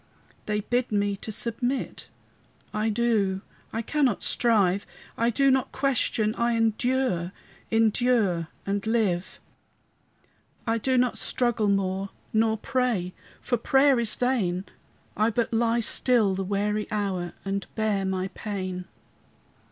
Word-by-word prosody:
They 210 0 0
bid 245 +3 -1
me 205 -1 +1
to 220 - -7
submit; 245 +5 -2 0.6
I 215 +1 0
do, 210 -4 +1 0.3
I 225 - -3
cannot 270 -4 +1
strive; 205 -5 +2 0.3
I 230 +1 +2
do 275 +4 +3
not 260 -1 +1
question, 245 -5 +1
I 235 0 +2
endure, 225 -5 +1 0.4
Endure 225 -6 +2 0.2
and 200 +1 -2
live. 200 -6 0 1.3
I 230 -1 +1
do 260 +3 +1
not 250 -1 +2
struggle 235 -4 +1
more, 195 0 0 0.2
Nor 220 0 +2
pray, 220 -7 -1 0.3
for 245 - 0
prayer 270 +2 +4
is 230 -2 +2
vain; 200 -8 0 0.5
I 215 +2 +2
but 230 0 -1
lie 230 +1 +2
still 230 -3 +3
the 190 +1 -2
weary 205 +2 -1
hour, 195 -4 -2
And 195 0 -2
bear 215 -3 0
my 190 0 -1
pain. 185 -4 -5
220 Hz, 125 wpm, -26 LUFS, 195-240 Hz, 1.3 s, prayer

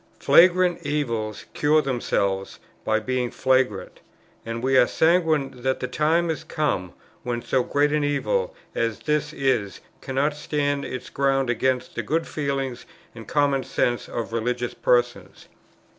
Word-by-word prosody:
Flagrant 180 0 +4
evils 115 -8 -2
cure 150 +1 +3
themselves 100 -8 -1 0.3
by 110 0 +1
being 125 +2 -1
flagrant; 130 -6 0 0.4
and 115 +1 -5
we 135 +1 +2
are 120 - +6
sanguine 160 -4 +2
that 130 +1 0
the 125 - -3
time 165 +4 +1
is 160 - -5
come 95 - -2 0.3
when 120 -1 -3
so 130 - +1
great 145 +4 +1
an 150 -1 +1
evil 480 - 0 0.2
as 115 -3 -2
this 150 -1 0
is, 125 -8 -1 0.2
cannot 140 +3 -1
stand 145 -1 -1
its 130 - -6
ground 135 -2 +1
against 130 +1 -1
the - - -2
good 165 +2 -1
feeling 135 -3 -2 0.4
and 115 -1 -11
common 140 -2 +1
sense 120 -1 -1
of 115 -1 -4
religious 120 +1 -2
persons. 120 -1 0
135 Hz, 145 wpm, -24 LUFS, 120-150 Hz, 0.4 s, are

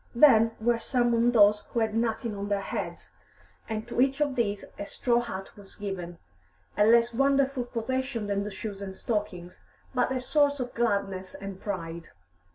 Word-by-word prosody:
Then 230 -4 +6
were 235 +1 +2
summoned 240 -1 +2
those 210 -2 +6
who 235 - -1
had 220 -1 0
nothing 225 0 -1
on 200 0 -4
their 200 -1 0
heads, - - -5 0.6
and 220 +1 -3
to 240 - 0
each 270 +2 +2
of 290 -2 +1
these 205 -5 -1
a - - -2
straw 240 -1 +1
hat 195 -5 -6
was 200 -1 -12
given, 180 -4 -5 0.6
a 210 - +4
less 235 +1 +5
wonderful 275 0 +2
possession 245 0 -2
than 200 -1 -1
the 210 - -4
shoes 205 -1 -6
and 190 -1 -6
stockings, 195 -5 -4 0.3
but 250 0 +1
a 260 - 0
source 285 +2 +2
of 250 -1 -4
gladness 200 -5 -1
and 195 -1 -8
pride. 170 -4 -5
225 Hz, 170 wpm, -28 LUFS, 200-245 Hz, 0.6 s, Then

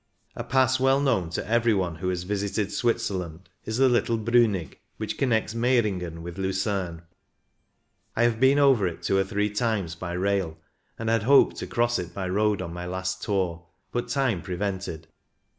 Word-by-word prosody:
A - - -4
Pass 130 0 +2
well 135 +1 +4
known 115 -12 +1
to 85 - -4
every 115 0 +3
one 90 -4 -1
who 90 +2 -2
has 90 -1 -2
visited 100 +1 -2
Switzerland 95 -8 -2 0.2
is 110 +1 -2
the 135 0 +5
little 120 -2 +2
Brlinig, 110 - +1 0.2
which 110 0 -3
connects 110 -5 0
Meiringen 105 -9 0
with 85 +2 -7
Lucerne. 95 -3 -2 1.1
I 115 - +2
have 120 -2 +2
been 130 +2 +5
over 135 -9 +4
it 85 - -6
two 95 - +2
or - - +3
three 105 +2 -1
times 105 -6 -1
by 85 +1 -6
rail, 95 -3 -1 0.4
and 115 - -5
had 115 0 +2
hoped 135 +6 +5
to - - -5
cross 120 0 +1
it 85 -1 -6
by 95 -2 -3
road 105 +1 +1
on 85 -2 -6
my 90 0 -6
last 95 +1 -3
tour, 90 -4 -2 0.2
but 120 - -2
time 130 -10 0
prevented. 95 -3 -4
100 Hz, 175 wpm, -26 LUFS, 90-115 Hz, 1.1 s, the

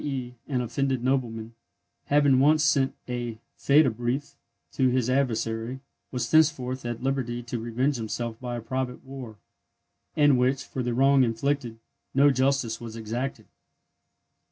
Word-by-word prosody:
e._ 130 -4 -4 0.2
an 125 -2 +1
offended 130 +1 -1
nobleman, 120 -4 -1 0.5
having 145 -2 +4
once 150 +3 +4
sent 140 -2 +2
a 120 -2 -4 0.2
Fehde 140 -4 +4
brief 120 +5 -2 0.4
to 130 -2 +2
his 125 -1 +1
adversary, 120 -2 -1 0.3
was 120 -2 -3
thenceforth 135 -5 +3
at 120 0 -5
liberty 125 -3 -1
to 120 0 -4
revenge 125 +5 0
himself 115 0 -4
by 125 -1 -4
a 120 - -4
private 130 +2 -4
war, 130 -5 -9 0.8
in 145 -3 +5
which, 130 +2 +1
for 130 - -5
the 120 -1 -1
wrong 135 +1 +5
inflicted, 120 0 -1 0.4
no 140 +1 +6
justice 130 -4 0
was 115 -1 -7
exacted. 115 +5 -4
125 Hz, 140 wpm, -26 LUFS, 120-135 Hz, 0.8 s, no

